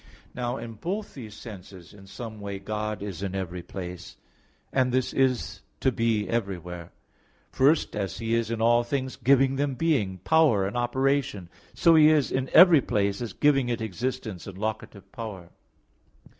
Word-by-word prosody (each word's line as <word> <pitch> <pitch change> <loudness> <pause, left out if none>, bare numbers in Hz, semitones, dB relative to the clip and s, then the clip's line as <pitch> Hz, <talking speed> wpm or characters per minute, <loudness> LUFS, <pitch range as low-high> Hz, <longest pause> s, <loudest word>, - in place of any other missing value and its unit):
Now 125 +1 -3
in 115 -2 -7
both 195 - -5
these 110 -6 -9
senses, 95 -6 -11
in 100 -1 -15
some 110 +1 -8
way 100 -1 -5
God 105 +1 -4
is 100 -3 -6
in 95 -1 -3
every 90 -2 -4
place; 90 0 -8 0.6
and 130 -1 +2
this 130 0 0
is 120 -9 0 0.2
to 130 - +2
be 115 -3 0
everywhere. 90 -5 -4 0.6
First, 145 +4 +2
as 100 -2 -3
He 115 0 -2
is 115 -1 +1
in 115 -1 -2
all 120 +1 +4
things 130 +1 -3
giving 135 +1 +3
them 140 -1 -1
being, 125 - 0
power 155 -12 +4
and 100 - -4
operation; 120 -6 0 0.3
so 170 - +5
He 155 -1 +7
is 150 -3 +2
in 130 0 -1
every 170 -4 +8
place 100 -2 -1
as 120 - -5
giving 135 -4 +2
it 120 -1 -1
existence 110 -2 -4
and 95 -1 -9
locative 105 -1 -5
power. 100 -7 -8
115 Hz, 165 wpm, -26 LUFS, 100-130 Hz, 0.6 s, every